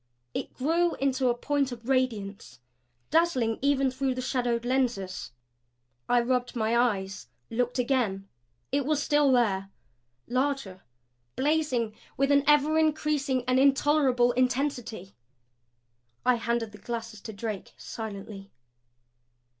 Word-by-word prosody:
It - - -5
grew 335 +5 +1
into 265 -1 +1
a 240 - +2
point 280 0 0
of 235 -1 -9
radiance, 215 - -1 0.5
dazzling 270 -9 +2
even 275 -1 +2
through 260 0 -1
the - - -4
shadowed 240 -2 -1
lenses. 215 - -1 0.8
I 245 0 +4
rubbed 250 0 -1
my 225 0 +1
eyes; 200 -6 0 0.2
looked 245 +2 -1
again. 240 -7 0 0.4
It 280 +1 +1
was 300 -2 +1
still 295 -2 +3
there, 200 -6 +2 0.6
larger 255 -7 -1 0.5
blazing 265 -7 0 0.2
with 275 +1 +2
an 285 0 +5
ever 300 +1 +4
increasing 300 -4 +1
and 255 0 +3
intolerable 275 -3 +4
intensity. 250 -6 -1 1.1
I 250 - +5
handed 235 -1 -1
the 210 - -13
glasses 230 -2 -6
to 220 - -7
Drake, 210 -1 -6
silently. 200 -2 -7
250 Hz, 120 wpm, -28 LUFS, 225-275 Hz, 1.1 s, an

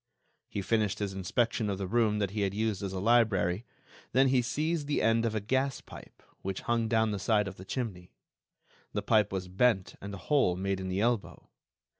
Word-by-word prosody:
He 100 - -3
finished 105 -2 +1
his 100 -2 -3
inspection 105 +4 0
of 100 - -1
the 95 - -3
room 110 +1 +2
that 100 -2 -1
he 105 0 -2
had 100 -1 0
used 110 -2 -1
as 100 -2 -3
a 95 - -3
library; 105 -3 +2 0.5
then 135 +1 +5
he 130 -1 +4
seized 150 +5 -1
the 145 - +1
end 115 +1 +3
of 110 - -3
a - - +1
gas 130 +6 0
pipe, - - -13 0.2
which 95 0 -4
hung 115 -1 0
down 110 -1 +2
the 100 - -2
side 105 +1 +2
of 95 - -7
the 95 - -10
chimney. 95 -7 -4 0.8
The - - -2
pipe 105 -2 +3
was 95 -1 -3
bent 95 +1 +2
and 100 - -6
a 100 - -6
hole 135 -5 +2
made 95 +1 -1
in 95 - -4
the 95 +2 -1
elbow. 120 -1 -1
105 Hz, 210 wpm, -30 LUFS, 95-120 Hz, 0.8 s, then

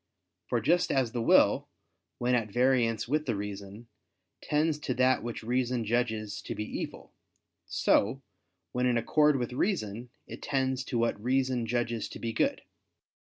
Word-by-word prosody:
For - - +1
just 175 +5 +2
as 130 -4 +1
the 120 - -2
will, - - +4 0.5
when 125 +1 0
at 115 -3 +1
variance 120 -1 +2
with 150 +3 0
the 115 - 0
reason, 100 +2 -7 0.5
tends 150 0 +1
to 130 -4 -2
that 130 +1 +3
which 120 0 -5
reason 125 0 0
judges 110 -2 -1
to - - -5
be 105 - -3
evil; - - -6 0.5
so, 130 +7 +2 0.5
when 125 0 +1
in 120 -1 +2
accord 150 +5 +3
with 125 -2 -2
reason, 125 - -2 0.2
it - - -9
tends 130 -2 0
to 120 - -2
what 115 -3 0
reason 130 -2 +1
judges 120 -1 -1
to - - -8
be 115 -1 -4
good. - - 0
120 Hz, 160 wpm, -29 LUFS, 115-130 Hz, 0.5 s, will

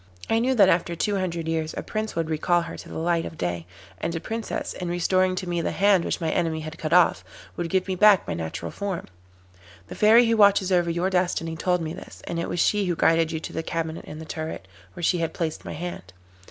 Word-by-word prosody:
I 225 - +4
knew 260 +3 +1
that 200 -5 +6
after 170 -1 +1
two 200 +5 0
hundred 170 -3 -2
years 160 -1 -2
a - - -3
Prince 215 0 -4
would 165 -1 -1
recall 170 +2 +1
her 165 - -7
to - - -10
the - - -6
light 165 0 +1
of 160 - -8
day, 85 -1 -3 0.3
and 170 - -2
a - - -1
Princess, 225 +5 -4
in 180 -1 -5
restoring 185 +1 +2
to 185 0 -4
me 175 -1 -1
the - - -1
hand 195 -3 +4
which - - -1
my 165 -2 -1
enemy 160 -2 0
had 155 +1 -8
cut 155 - -3
off, 175 0 +4 0.3
would 170 -1 -3
give 190 +2 +1
me 190 - -1
back 200 +1 +5
my - - -2
natural 80 -1 -5
form. 200 -3 -4 0.8
The - - -6
Fairy 225 +3 +6
who 230 0 +2
watches 200 -2 +5
over 175 -2 +3
your 175 +3 0
destiny 175 -3 0
told 180 +1 0
me 160 0 -4
this, 180 - -11
and 170 - -3
it 170 - -3
was 175 - -2
she 205 +3 +2
who 175 - 0
guided 165 +1 +3
you 160 - -2
to - - -7
the 160 - -2
cabinet 160 0 -4
in 150 - -8
the 160 - -8
turret, 155 - -6 0.3
where 175 - -8
she 175 +1 +2
had 165 -1 -2
placed 160 -2 -3
my - - -5
hand. 160 - -7
170 Hz, 245 wpm, -25 LUFS, 160-185 Hz, 0.8 s, that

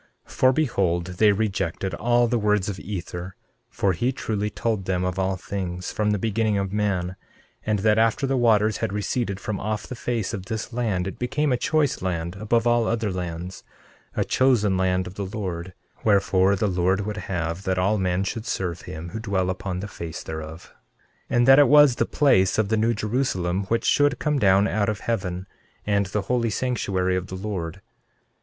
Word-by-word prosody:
13:2 - - -18
For 130 - +4
behold, 100 - +1 0.2
they 105 -1 +7
rejected 95 -3 -1
all 120 +6 +2
the 120 0 +1
words 105 -2 +1
of 100 -2 -4
Ether; 90 -2 -6 0.3
for 95 -2 0
he 120 +10 0
truly 105 -5 -2
told 110 -3 -2
them 90 -1 0
of 90 +1 -2
all 95 0 +1
things, 90 -1 -4
from 105 -1 0
the 105 - +2
beginning 110 0 0
of 100 -1 -2
man; 95 -4 -1 0.5
and 105 -1 +2
that 105 +2 +3
after 115 +4 +2
the 135 0 0
waters 110 -4 +3
had - - -2
receded 100 0 -2
from 110 -3 -4
off 110 +1 -3
the - - -7
face 120 -3 -2
of 95 -2 -5
this 110 +1 -4
land 110 -7 -1
it 95 - -6
became 145 +4 0
a - - +3
choice 150 +2 +1
land 85 -1 -2
above 115 +3 +1
all 120 -1 +3
other 110 -3 0
lands, 90 0 -5 0.5
a - - +1
chosen 120 -7 +3
land 95 0 +1
of 90 - -8
the 100 - -4
Lord; 90 -3 -4 0.3
wherefore 100 -2 +3
the 100 - 0
Lord 95 0 +1
would 105 +1 -4
have 85 -1 -2
that 95 -1 0
all 100 +3 +2
men 90 0 0
should 110 +3 -4
serve 90 -5 -2
him 80 +2 -7
who 110 - -5
dwell 95 -4 0
upon 95 0 -4
the 105 - -5
face 85 -5 -7
thereof; 80 +1 -8 0.6
13:3 - - +1
And 120 +1 +4
that 135 +1 +8
it 145 - +7
was 145 -4 +6
the 115 - +1
place 95 -11 +3
of 110 -2 +1
the 110 - +2
New 115 +2 +2
Jerusalem, 100 -5 -1
which 115 +4 -1
should 145 -2 +3
come 150 -2 0
down 100 -1 +4
out 105 -2 0
of 105 0 -3
heaven, 95 -5 -2 0.4
and 100 -1 +1
the 100 +1 -2
holy 120 +2 0
sanctuary 95 -6 0
of 90 0 -2
the 95 - -6
Lord. 95 -4 -5
100 Hz, 200 wpm, -24 LUFS, 95-115 Hz, 0.6 s, that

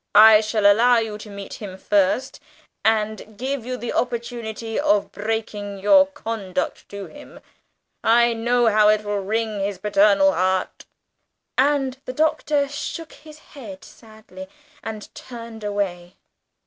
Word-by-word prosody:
"I 215 0 +9
shall 215 -1 -1
allow 235 +4 +6
you 220 -2 -2
to 215 - -10
meet 200 +1 -9
him 190 -3 -7
first, 205 +7 0 0.4
and 215 -1 -1
give 260 0 -3
you 255 0 -3
the 240 - -5
opportunity 235 -2 -3
of 205 -1 +1
breaking 210 -1 -4
your 280 +9 +5
conduct 215 -9 -4
to 200 -1 -7
him. 290 +6 -13 0.6
I 235 +1 +4
know 240 +2 +1
how 215 -1 +5
it 215 0 +2
will 205 -1 -2
wring 215 +1 -2
his 195 0 -2
paternal 200 0 +4
heart!" 185 +1 -1 0.7
and 270 -1 +1
the 255 - -5
Doctor 300 -1 +1
shook 295 +3 -6
his 305 0 -14 0.2
head 215 -10 -10
sadly, 220 +5 -13 0.3
and 220 -1 -8
turned 230 -3 -10
away. 190 -4 -3
220 Hz, 135 wpm, -22 LUFS, 205-245 Hz, 0.7 s, I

